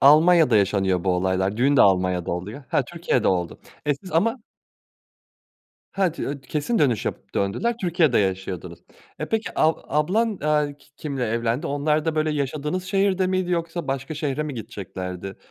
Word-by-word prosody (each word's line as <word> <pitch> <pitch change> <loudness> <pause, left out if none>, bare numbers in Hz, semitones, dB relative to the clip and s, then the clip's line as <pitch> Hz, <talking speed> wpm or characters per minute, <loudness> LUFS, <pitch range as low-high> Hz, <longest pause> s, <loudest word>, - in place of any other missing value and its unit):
Almanya'da 155 -3 +6
yaşanıyor 95 -2 +2
bu 95 - +2
olaylar, 95 +2 0
düğün 140 +4 +3
de - - +6
Almanya'da 90 -2 +2
oluyor. 100 +11 -5
Ha, - - +2
Türkiye'de 165 -7 0
oldu, 90 -3 -1 0.3
e, 145 - +3
siz 155 +5 -12
ama 225 +10 +2 1.5
Ha, 190 -4 +1
t - - -10
öt 140 -1 -5
kesin 160 +10 -1
dönüş 125 - +2
yapıp - - -5
döndüler, 120 - 0
Türkiye'de 170 -7 +3
yaşıyordunuz. 95 -3 -2 0.4
E, - - -3
peki, 225 0 -1
ab 160 +1 +3
ablan, 195 +9 +1
aaa, 150 -1 +2
ki 145 - -24
kimle 135 -5 -3
evlendi? 115 +6 -1
Onlar 150 +2 +1
da, 160 - 0
böyle, 155 0 +1
yaşadığınız 150 +5 -2
şehirde 195 -1 +1
miydi 185 -1 0
yoksa 170 -2 -2
başka 135 +3 -3
şehre 150 -1 -2
mi 150 -3 -5
gideceklerdi? 95 -3 -6
145 Hz, 160 wpm, -24 LUFS, 100-165 Hz, 1.5 s, Almanya'da